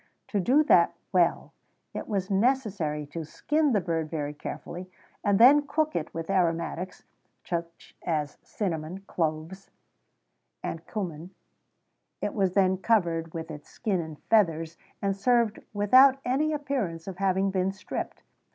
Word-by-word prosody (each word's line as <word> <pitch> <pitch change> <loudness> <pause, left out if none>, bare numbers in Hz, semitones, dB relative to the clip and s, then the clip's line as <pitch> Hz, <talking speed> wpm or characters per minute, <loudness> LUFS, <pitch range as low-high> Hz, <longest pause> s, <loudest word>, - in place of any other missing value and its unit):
To 205 - 0
do 260 - +4
that 305 - +4 0.2
well, - - +2 0.4
it - - -5
was 200 -2 -2
necessary 195 - +1
to 165 +3 -6
skin 295 - 0
the 215 - +3
bird 165 -4 -2
very 150 -2 -3
carefully, 175 +4 -7 0.3
and 200 -1 +3
then 285 +6 +7
cook 310 +1 0
it - - -2
with 165 0 -5
aromatics, 180 -1 -1 0.4
such 170 -1 -5
as 150 -3 -2
cinnamon, 175 -2 -4
cloves, 165 +1 -3 1.0
&c. 170 -1 -5 0.9
It - - -2
was 190 -4 +1
then 190 -1 +4
covered 170 -7 +1
with 165 0 -5
its 150 -1 -10
skin 195 -5 -1
and 160 -2 -8
feathers, 165 -6 +2 0.3
and 195 -1 +1
served 230 +1 +2
without 255 +7 +6
any 280 +5 +1
appearance 260 - -2
of 190 -2 -7
having 190 0 +1
been 190 0 +1
stripped. 195 - -6
190 Hz, 135 wpm, -27 LUFS, 165-220 Hz, 1.0 s, then